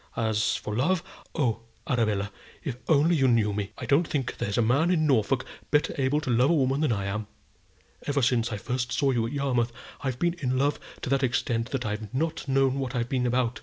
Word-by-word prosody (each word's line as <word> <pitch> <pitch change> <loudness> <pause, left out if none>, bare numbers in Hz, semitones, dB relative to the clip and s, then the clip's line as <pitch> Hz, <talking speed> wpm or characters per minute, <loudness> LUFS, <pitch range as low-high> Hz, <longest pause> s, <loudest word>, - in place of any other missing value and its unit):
As 110 -2 +1
for 105 - -4
love; 165 +9 +1 0.3
oh, 120 -8 +1 0.3
Arabella, 110 -8 0 0.3
if 140 -6 -2
you 120 - -17
only 160 0 +4
knew 115 -5 +3
me! 100 -1 -3
I - - -5
don't 155 +4 +3
think 135 -5 -2
there's 100 - -1
a - - +4
man 140 +9 +3
in 165 -4 +2
Norfolk 130 -2 +2 0.2
better 150 0 +2
able 135 +2 +1
to 130 - -2
love 125 +3 +4
a 170 - +4
woman 135 0 +1
than 155 - +2
I 100 -3 -1
am. 105 +2 -3 0.8
Ever 140 -2 +1
since 120 -2 +2
I 105 - -2
first 125 +3 -3
saw 140 -1 +2
you 115 -3 +1
at - - -6
Yarmouth, 125 -4 0 0.3
I've 130 -3 -1
been 175 +3 +1
in 130 -1 0
love 140 +2 +1 0.2
to - - -2
that 135 -1 +3
extent 120 -2 0
that 130 -3 -2
I've 105 -1 -4
not 155 +1 -1
known 135 0 +2
what 130 -1 -3
I've 120 0 -1
been 125 -2 +1
about. 125 0 0
130 Hz, 220 wpm, -27 LUFS, 115-140 Hz, 0.8 s, only